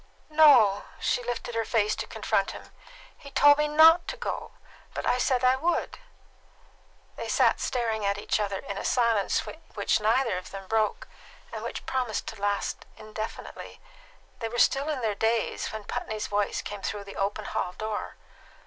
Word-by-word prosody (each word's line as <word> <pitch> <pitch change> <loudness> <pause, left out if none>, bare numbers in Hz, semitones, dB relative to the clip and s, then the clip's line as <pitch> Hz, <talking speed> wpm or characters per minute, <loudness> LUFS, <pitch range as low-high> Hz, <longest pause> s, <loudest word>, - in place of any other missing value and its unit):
"No;" 255 -11 +6
she - - 0
lifted 240 0 -4
her 230 0 0
face 215 -2 +1
to - - -4
confront - - -1
him. - - -15 0.4
"He 280 - -12
told 290 +2 +6
me 300 - +2
not 320 +3 +6
to - - -4
go; 485 - -5 0.4
but - - -3
I 250 - +2
said 255 0 +1
I 255 +1 +5
would." 335 +6 -1 1.2
They - - -5
sat - - +3
staring 225 -4 -1
at 200 0 +1
each 205 - -1
other 200 -2 -1
in 200 +1 -6
a - - -5
silence 230 -5 +1 0.3
which 210 +1 +1
neither 225 -1 +2
of 185 - -12
them 195 -1 -8
broke, 220 +1 0 0.5
and - - -5
which - - -5
promised 250 -5 -2
to 220 -3 -10
last 205 0 -2
indefinitely. 215 +1 -7 0.6
They 225 -2 -3
were 240 - -5
still 275 +5 +3
in 290 -4 -2
their 220 -2 0
daze 225 +2 0
when 220 -1 -6
Putney's 215 +1 -4
voice 205 0 -1
came 205 -1 -6
through 205 0 -4
the 200 0 -11
open 200 +2 -2
hall 180 - -2
door. 215 +1 -4
220 Hz, 175 wpm, -27 LUFS, 205-255 Hz, 1.2 s, No